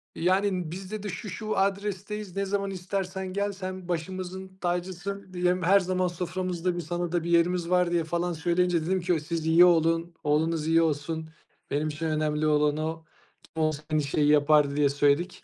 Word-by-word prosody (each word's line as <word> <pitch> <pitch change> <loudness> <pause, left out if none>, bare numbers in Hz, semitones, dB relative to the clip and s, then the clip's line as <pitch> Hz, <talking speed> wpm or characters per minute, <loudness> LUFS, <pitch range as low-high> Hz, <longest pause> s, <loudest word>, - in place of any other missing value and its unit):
Yani, 185 -1 +1
biz 190 +2 -7
dedi 210 -1 -4
"Şu, 200 +3 -6
şu 215 +3 -4
adresteyiz. 200 0 -2
Ne 200 0 0
zaman 195 0 -1
istersen 190 0 -4
gel. 200 +1 0
Sen 185 -2 -6
başımızın 185 +2 -5
tacısın, 185 +2 -3
diye. 180 0 +2
Her 185 +2 +4
zaman 185 -1 0
soframızda, 180 0 -2
bir, 175 - -2
sana 175 +1 -3
da 175 -2 0
bir 170 - -4
yerimiz 170 0 +2
var." 180 -1 +3
diye, 170 -1 +2
falan 170 +2 -1
söyleyince 170 0 +1
dedim 185 +1 0
ki 175 -2 +1
"Siz 160 +1 -4
iyi 165 +2 +7
olun, 165 0 +2
oğlunuz 155 +1 +1
iyi 165 +1 +4
olsun. 160 +1 -1 0.4
Benim 145 +2 0
için 155 +2 -4
önemli 155 -1 0
olan 150 0 +2
o. 160 +1 -3 0.4
Kim 160 - -4
olsa 155 -1 -1
aynı 155 -1 +2
şeyi 145 +1 +1
yapardı." 150 -1 +4
diye 145 -1 +3
söyledik. 145 +5 +1
175 Hz, 180 wpm, -27 LUFS, 160-185 Hz, 0.4 s, iyi